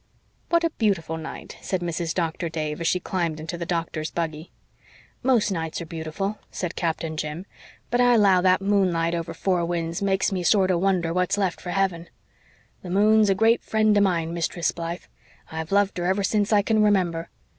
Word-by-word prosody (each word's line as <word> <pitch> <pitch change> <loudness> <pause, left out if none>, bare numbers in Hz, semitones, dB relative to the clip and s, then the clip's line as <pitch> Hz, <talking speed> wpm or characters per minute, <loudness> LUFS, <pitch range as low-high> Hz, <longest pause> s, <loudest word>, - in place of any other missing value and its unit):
"What 340 0 +3
a 335 - +1
beautiful 190 -8 0
night," 160 0 -8
said 185 -2 -2
Mrs. 170 -1 -2
Doctor 170 -1 -2
Dave, 155 -1 -4
as 165 - 0
she 180 - +2
climbed 170 -4 -2
into 160 +2 -5
the 170 0 -5
Doctor's 165 -2 -2
buggy. 160 -1 -4 0.7
"Most 240 -5 +2
nights 160 -3 -3
are 170 - -5
beautiful," 165 +6 -4
said 180 -3 -4
Captain 165 -1 -2
Jim. 155 +4 -4 0.5
"But 245 +1 +3
I 245 -1 +5
'low 195 -4 +5
that 185 +1 +3
moonlight 180 -5 +2
over 170 -1 -3
Four 180 -3 0
Winds 170 +1 -2
makes 195 0 +1
me 185 -2 -1
sorter 185 +1 +3
wonder 175 -2 +1
what's 180 +2 +1
left 190 -4 -1
for 180 - -7
heaven. 180 -3 -1 0.7
The 180 - -8
moon's 210 +3 +4
a 195 - +3
great 225 +4 +3
friend 215 -1 +2
of 205 - +4
mine, 170 -4 +1
Mistress 170 0 -1
Blythe. 170 +1 -5 0.5
I've 160 +1 -5
loved 200 -2 +2
her 175 - -2
ever 190 +2 +1
since 205 +1 +1
I 205 -1 +4
can 220 +1 +2
remember. 180 -5 +1
180 Hz, 190 wpm, -24 LUFS, 165-200 Hz, 0.7 s, I